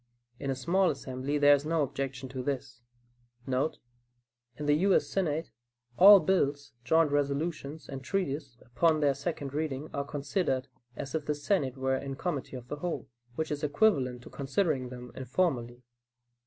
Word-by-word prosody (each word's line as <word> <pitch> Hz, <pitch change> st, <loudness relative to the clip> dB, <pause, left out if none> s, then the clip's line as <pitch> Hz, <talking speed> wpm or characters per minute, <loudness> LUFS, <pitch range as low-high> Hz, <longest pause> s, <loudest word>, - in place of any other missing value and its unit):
In 140 Hz, -, -3 dB
a 135 Hz, -, 0 dB
small 175 Hz, +8 st, +2 dB
assembly 135 Hz, 0 st, -3 dB
there 145 Hz, 0 st, +7 dB
is 145 Hz, 0 st, +2 dB
no 160 Hz, 0 st, +1 dB
objection 135 Hz, -1 st, -4 dB
to 130 Hz, 0 st, -5 dB
this.* 130 Hz, -2 st, -4 dB, 0.6 s
[In 130 Hz, +4 st, +1 dB, 1.0 s
the 145 Hz, -, +4 dB
U. 185 Hz, +5 st, +4 dB
S. -, -, +2 dB
Senate 165 Hz, -4 st, -1 dB, 0.4 s
all 200 Hz, +5 st, +10 dB
bills, 145 Hz, -5 st, 0 dB
joint 160 Hz, +4 st, +3 dB
resolutions 145 Hz, +1 st, -2 dB
and 135 Hz, -1 st, -7 dB
treaties, 140 Hz, -6 st, -2 dB
upon 155 Hz, +5 st, +2 dB
their 145 Hz, -2 st, +4 dB
second 140 Hz, -1 st, -4 dB
reading 150 Hz, -1 st, -3 dB
are 140 Hz, -, -1 dB
considered 140 Hz, -1 st, -1 dB, 0.3 s
"as 140 Hz, -, -6 dB
if 160 Hz, -2 st, -2 dB
the 150 Hz, -, +1 dB
Senate 145 Hz, -4 st, 0 dB
were 130 Hz, 0 st, +1 dB
in 135 Hz, 0 st, -5 dB
committee 145 Hz, -4 st, -3 dB
of 125 Hz, -1 st, -8 dB
the 150 Hz, -, -5 dB
whole," 160 Hz, -3 st, -4 dB, 0.3 s
which 160 Hz, +2 st, -2 dB
is 150 Hz, 0 st, -3 dB
equivalent 140 Hz, -, +2 dB
to -, -, -12 dB
considering 140 Hz, -2 st, 0 dB
them 125 Hz, -1 st, -9 dB
informally. 125 Hz, -3 st, -1 dB
145 Hz, 160 wpm, -30 LUFS, 130-160 Hz, 1.0 s, all